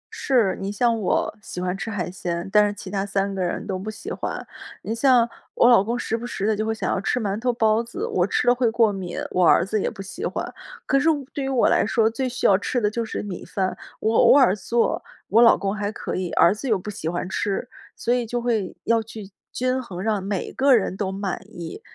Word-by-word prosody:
是， 235 -8 +2
你 195 +1 -3
像 230 +2 +1
我 185 - 0
喜 195 - -7
欢 180 0 -1
吃 195 - -5
海 185 -5 -3
鲜， 175 -1 -4
但 210 -1 +6
是 - - -1
其 190 -1 -9
他 195 -1 -1
3 200 0 -1
个 190 - -3
人 175 -1 -2
都 190 -2 -3
不 205 +3 -5
喜 215 - -7
欢。 - - -4 0.4
你 220 - -3
像 240 0 +4 0.3
我 - - +5
老 235 -6 +6
公 235 +4 -2
时 225 - -2
不 230 - -5
时 200 - -3
地 215 0 +2
就 215 +1 -2
会 - - +1
想 220 - -2
要 185 - -1
吃 250 - 0
馒 205 -2 -2
头 245 +2 +1
包 220 -1 +2
子， 235 0 -5
我 180 0 +1
吃 245 - 0
了 245 - +7
会 245 -1 +1
过 225 -2 +3
敏， 185 -3 -5
我 180 - +2
儿 - - +5
子 210 +2 -1
也 - - 0
不 195 - -9
喜 325 - -8
欢。 - - -3 0.3
可 275 - +3
是 310 +4 +3
我 290 -4 0
对 280 - -3
于 270 - -2
我 260 -3 +3
来 - - +3
说， 225 -2 +2
最 255 +3 -2
需 250 - -4
要 195 - +6
吃 245 - -1
的 210 -3 +1
就 235 +1 -2
是 220 - -4
米 195 -4 -6
饭， 185 -2 -2 0.3
我 220 +1 +1
偶 - - +7
尔 250 -9 +5
做， 230 +3 0 0.3
我 225 +3 +5
老 235 - +7
公 195 +1 -2
还 205 -1 -2
可 - - -5
以， 185 -1 -2
儿 170 - +5
子 250 +5 -5
又 215 - +3
不 200 +3 -6
喜 165 -5 -4
欢 175 +1 -3
吃， 200 +4 -2 0.3
所 240 - 0
以 245 -2 0
就 240 +2 -2
会 230 -5 -1
要 230 -1 +2
去， 215 -2 -10 0.2
均 255 +1 -1
衡， 190 -8 -8
让 205 0 -1
每 195 -1 -3
个 270 -1 +4
人 200 -4 0
都 190 -1 -2
满 195 -1 -3
意 175 -6 -8
215 Hz, 270 characters per minute, -23 LUFS, 195-235 Hz, 0.4 s, 了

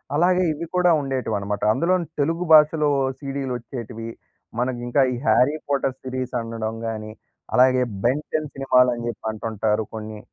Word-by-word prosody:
అలాగే 180 +3 +3
ఇవి 165 +3 -5
కూడా 180 -1 +4
ఉండేటివన్నమాట. 110 -7 -2
అందులోను 175 +4 +1
తెలుగు 165 +4 0
భాషలో 150 -1 +6 0.3
సీడీలు 135 -2 -4
వొచ్చేటివి. 115 -2 -7 0.5
మనకి 125 0 -1
ఇంకా 130 +3 +2
ఈ - - -3
'హ్యారీ 135 +5 +4
పోటర్' 135 -2 0
సీరీస్ 130 -1 -4
అనడం 115 -1 -4
గాని, 110 -1 -5 0.4
అలాగే 130 0 +5 0.2
'బెన్ 135 +5 +1
టెన్' 155 -2 -1
సినిమాలని 125 -3 +2
చెప్పి 120 - -6
అంటుంటారు 110 0 -1
కొన్ని. 110 -1 -7
130 Hz, 140 wpm, -23 LUFS, 115-145 Hz, 0.5 s, భాషలో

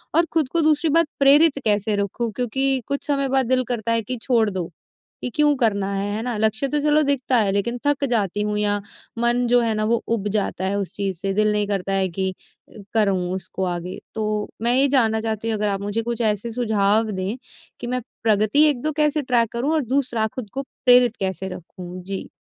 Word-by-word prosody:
और 335 +1 +5
खुद 315 -5 +1
को 335 - +2
दूसरी 310 0 +2
बात 330 +1 +3
प्रेरित 280 +2 +5
कैसे 210 0 +2
रखूँ? 205 +3 -2
क्योंकि 265 +2 0
कुछ 280 +2 -3
समय 275 -2 +1
बाद 265 0 +2
दिल 255 +1 +2
करता 230 -1 -2
है 230 0 +2
कि 250 +3 -5
छोड़ 230 -4 +2
दो 185 -3 -4 0.5
कि - - -3
क्यों 295 -1 +4
करना 200 -5 +1
है, 195 +1 -1
है 220 - -3
ना? 245 -2 -2
लक्ष्य 220 +5 +1
तो 295 +2 0
चलो 300 +1 +3
दिखता 270 -2 +1
है 210 -4 +2
लेकिन 205 +5 -1
थक 290 -1 +2
जाती 205 -4 0
हूँ 210 0 -1
या 205 0 +1 0.4
मन 240 +1 +2
जो 245 +1 +4
है 230 -1 +1
ना 215 0 0
वो 230 +1 +1
ऊब 210 -2 -3
जाता 195 -2 -1
है 195 +1 0
उस 195 - -4
चीज 195 -3 -2
से 195 -1 -1
दिल 215 +1 +2
नहीं 210 -1 0
करता 195 -1 -2
है 195 -1 +2
कि 190 +2 -2 0.6
करूँ 205 -4 +2 0.2
उसको 190 0 -5
आगे? 175 0 -4 0.2
तो 215 -1 -2
मैं 235 +1 +2
ये 275 +2 +4
जानना 225 -5 +2
चाहती 225 0 -3
हूँ 220 - 0
अगर 210 0 0
आप 195 0 -2
मुझे 205 +3 -2
कुछ 235 0 -3
ऐसे 215 +1 0
सुझाव 220 -2 +1
दें 190 +2 -3 0.4
कि 240 - -5
मैं 250 0 -1 0.2
प्रगति 215 +6 +3
1-2 295 +2 -1
कैसे 300 0 +2
ट्रैक 240 -4 +1
करूँ 260 +7 0
और 310 - +2
दूसरा 245 -3 0
खुद 245 -5 -6
को 270 - -2
प्रेरित 245 -3 +3
कैसे 190 0 -2
रखूँ? 180 +1 -9
जी। 195 +1 -6
225 Hz, 215 wpm, -22 LUFS, 205-260 Hz, 0.6 s, और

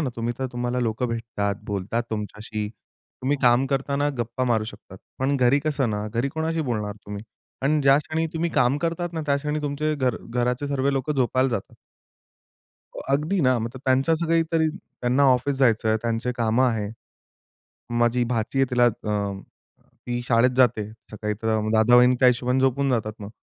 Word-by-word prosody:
ना 135 -5 -1
तुम्ही 120 +1 -2
तर 130 - -1
तुम्हाला 120 +1 -2
लोक 115 0 -2
भेटतात, 115 -4 -2
बोलतात 105 +4 -2
तुमच्याशी. 105 0 -4 0.5
तुम्ही 140 +3 +1
काम 125 +2 +4
करताना 140 +2 0
गप्पा 120 +2 -2
मारू 115 -3 +1
शकतात. 95 -3 -11 0.2
पण 135 +2 +1
घरी 130 +2 +4
कसं 140 -6 0
ना 105 0 -2
घरी 120 +5 -1
कोणाशी 160 +1 -1
बोलणार 105 -3 -2
तुम्ही? 105 +1 -6 0.4
आणि 150 +2 +2
ज्या 135 0 +6
क्षणी 160 +2 -2
तुम्ही 170 +1 -1
काम 125 0 +2
करतात 170 +1 -2
ना 160 - -3
त्या 140 - +3
क्षणी 150 +1 -2
तुमचे 150 +2 -1
घर 130 -5 0
घराचे 125 +3 0
सर्व 140 -1 0
लोक 135 +2 -2
झोपायला 130 0 +1
जातात. 110 -5 -4 1.2
हो, - - -7
अगदी 155 +7 +1
ना. 130 -2 +3
मतलब 120 +3 -5
त्यांचं 135 +5 +3
असं 165 +1 -1
काही 165 0 +3
तरी 160 -1 +3
त्यांना 125 -5 -1
ऑफिस 135 +3 -1
जायचं 115 -4 +3
आहे, 110 - +3
त्यांचे 115 +1 -1
कामं 115 +3 +2
आहे. 105 -3 -2 1.1
माझी 120 +1 +2
भाची 120 +2 -2
आहे 135 - +5
तिला 120 0 +4
अं, 105 -3 -2 0.7
ती 120 0 -2
शाळेत 120 +1 +4
जाते 110 -5 +3 0.2
सकाळी 105 0 -3
तर 110 - -2
अ, - - +1
म 110 +1 -2
दादा-वाहिनी 120 +3 +6
त्या 130 - +6
हिशोबाने 125 +1 +2
झोपून 135 +1 +2
जातात 110 -4 0
मग. 100 0 -7
125 Hz, 180 wpm, -24 LUFS, 115-140 Hz, 1.2 s, ज्या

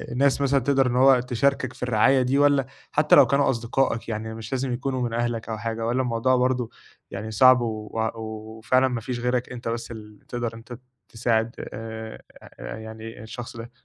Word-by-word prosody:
ناس 140 +2 +2
مثلًا 140 0 +3
تقدَر 135 0 +2
إن 120 - -1
هو 130 0 +6
تشاركك 130 +1 0
في - - -9
الرعاية 125 +3 +4
دي 130 +2 +1
والّا، 145 -2 +4 0.3
حتى 150 +1 +4
لو 130 - +8
كانوا 140 +2 +2
أصدقائك 115 -1 0
يعني 110 0 -4
مش 110 -1 -8
لازم 130 -1 -1
يكونوا 130 +1 -2
من 120 -2 -2
أهلك 115 -1 -2
أو 110 - -3
حاجة 115 +1 -3
والّا 120 +3 +1
الموضوع 125 +1 +1
برضه 125 -2 +1 0.4
يعني 110 +3 -5
صعب، 130 +3 +6
و 110 -2 -4 0.2
وفعلًا 110 +3 -1
ما 125 -2 -3
فيش 120 +2 -4
غيرك 125 0 -1
أنت 120 -1 -7
بس 115 0 -3
ال 105 -2 -10
تقدَر 120 -2 -3
أنت 120 +1 -10 0.3
تساعد 115 0 0 0.2
آآ 110 0 -7 0.4
يعني 110 0 -8
الشخص 120 +1 -8
ده؟ 115 +1 -8
120 Hz, 180 wpm, -24 LUFS, 110-130 Hz, 0.4 s, لو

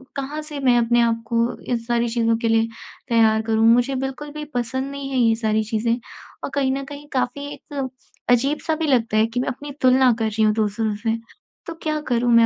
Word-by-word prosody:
कहाँ 285 +2 -4
से 300 -2 -7
मैं 255 -3 +4
अपने 235 0 +3
आप 230 -1 +1
को 235 +1 0
इन 245 - -1
सारी 235 0 +1
चीज़ों 230 -1 +1
के 230 0 -1
लिए 225 0 +3 0.4
तैयार 220 -2 +4
करूँ। 220 0 +2
मुझे 245 +3 +2
बिल्कुल 270 +3 -4
भी 300 0 -5
पसंद 260 +3 -2
नहीं 280 -1 -5
है 265 - -1
ये 225 -2 +4
सारी 220 -1 0
चीज़ें 225 +2 0 0.5
और - - -2
कहीं 270 -2 +2
न 275 - -4
कहीं 290 +1 -10
काफ़ी 260 +2 -1
एक 275 -2 -5 0.4
अजीब-सा 275 +6 +2
भी 320 0 -2
लगता 230 -5 +2
है 215 - +5
कि 235 +2 -3
मैं 255 - -1
अपनी 285 +3 -6
तुलना 255 0 +5
कर 225 - +1
रही 220 +1 0
हूँ 215 0 +4
दूसरों 215 0 0
से। 225 -1 +1 0.5
तो 335 - -5
क्या 310 -1 0
करूँ 240 0 +2
मैं 230 0 +7
240 Hz, 215 wpm, -22 LUFS, 225-275 Hz, 0.5 s, मैं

